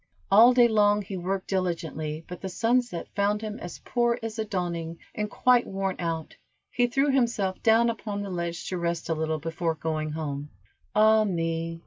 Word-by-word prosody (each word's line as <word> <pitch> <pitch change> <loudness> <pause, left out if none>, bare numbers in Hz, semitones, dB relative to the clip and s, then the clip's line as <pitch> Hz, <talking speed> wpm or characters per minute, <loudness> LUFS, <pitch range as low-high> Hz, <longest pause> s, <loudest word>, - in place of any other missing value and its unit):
All 225 +5 +8
day 245 -1 +6
long 210 -2 +3
he 195 0 -6
worked 190 +1 -3
diligently, 165 -4 -2
but 180 - -8
the 190 - -4
sunset 230 -1 0
found 205 +2 +1
him 215 +2 -5
as 175 - -7
poor 240 -1 +1
as 225 0 -4
the 220 - -1
dawning, 170 -4 -3 0.2
and 210 0 -3
quite 250 +3 +3
worn 195 -1 -2
out, 165 -2 -3 0.3
he 245 0 +2
threw 275 +3 +2
himself 235 -8 0
down 230 +1 +5
upon 210 -3 -3
the 200 - -6
ledge 170 0 -4
to 185 - -3
rest 170 -1 -2
a - - +2
little 160 0 -1
before 165 +1 -2
going 155 -1 -3
home. 145 -2 -4 0.5
"Ah, 215 +1 +6
me!" 165 -3 -2
190 Hz, 180 wpm, -27 LUFS, 165-220 Hz, 0.5 s, All